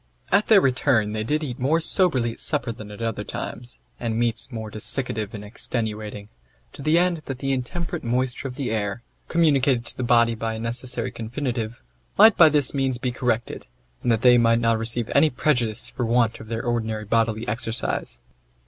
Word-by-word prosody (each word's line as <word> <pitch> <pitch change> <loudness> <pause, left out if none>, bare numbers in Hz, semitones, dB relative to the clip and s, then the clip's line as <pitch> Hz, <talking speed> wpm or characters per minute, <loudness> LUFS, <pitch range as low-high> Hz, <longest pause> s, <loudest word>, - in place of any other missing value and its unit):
At 200 +2 +3
their 210 -3 +6
return 125 -6 +1
they 110 0 -2
did 150 +7 -1
eat 130 -4 -5
more 145 +6 +2
soberly 160 - +2
at - - -12
supper 120 0 -2
than 110 -2 -10
at 105 +2 -8
other 110 -2 -2
times, 120 +3 -4 0.2
and 115 -2 -2
meats 120 +2 -1
more 110 -2 -6
desiccative 110 -1 +3
and 105 0 -8
extenuating; 105 -2 -4 0.5
to - - -10
the 155 +4 +2
end 180 0 +2
that 135 - -5
the 135 +1 -2
intemperate 170 +7 -3
moisture 125 +2 -1
of 125 - -8
the 130 -4 -3
air, 105 +1 -2 0.2
communicated 140 -7 +2
to - - -1
the - - -3
body 120 -1 +3
by 115 0 -3
a - - -6
necessary 120 +2 -3
confinitive, 120 -1 -4 0.4
might 225 - +8
by 160 -2 +7
this 145 -3 +2
means 135 -3 0
be 125 +1 -2
corrected, 120 - -2 0.3
and 120 - +1
that 115 -1 0
they 125 -1 +7
might 115 0 +4
not 115 -1 +1
receive 115 0 -1
any 150 +3 +5
prejudice 125 -5 -1
for 125 - -4
want 115 0 +1
of 110 - -11
their 115 0 -4
ordinary 110 -2 -2
bodily 115 +1 0
exercise. 115 - -2
120 Hz, 190 wpm, -23 LUFS, 110-135 Hz, 0.5 s, might